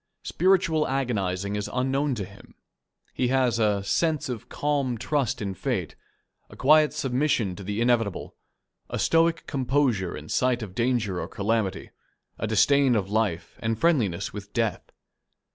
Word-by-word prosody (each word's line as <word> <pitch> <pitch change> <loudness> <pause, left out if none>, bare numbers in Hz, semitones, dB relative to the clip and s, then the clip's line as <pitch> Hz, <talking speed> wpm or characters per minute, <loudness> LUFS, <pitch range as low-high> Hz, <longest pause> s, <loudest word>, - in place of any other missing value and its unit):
Spiritual 175 -4 +2
agonizing 100 -7 -1
is 105 -1 -3
unknown 135 +2 0
to 100 -4 -4
him. 100 +1 -16 0.6
He 125 - 0
has 125 -2 +2
a 105 -3 +2
"sense 155 +7 0
of 120 -4 -6
calm 140 -4 -1
trust 135 -3 -1
in 100 -1 -3
fate, 90 - -3 0.5
a - - -13
quiet 150 +2 +5
submission 125 -7 0
to 100 - -8
the 105 +4 -3
inevitable, 120 -5 0 0.5
a - - -3
stoic 165 0 +2
composure 130 - 0
in 75 +1 -10
sight 125 +2 +1
of 95 -4 -8
danger 115 -5 0
or - - -4
calamity, 105 -2 -2 0.5
a - - -1
disdain 130 +4 +4
of 100 -2 -1
life 105 -6 -1
and 115 0 -1
friendliness 110 - +1
with 100 -1 -8
death." 115 -3 -2
120 Hz, 145 wpm, -26 LUFS, 100-135 Hz, 0.6 s, quiet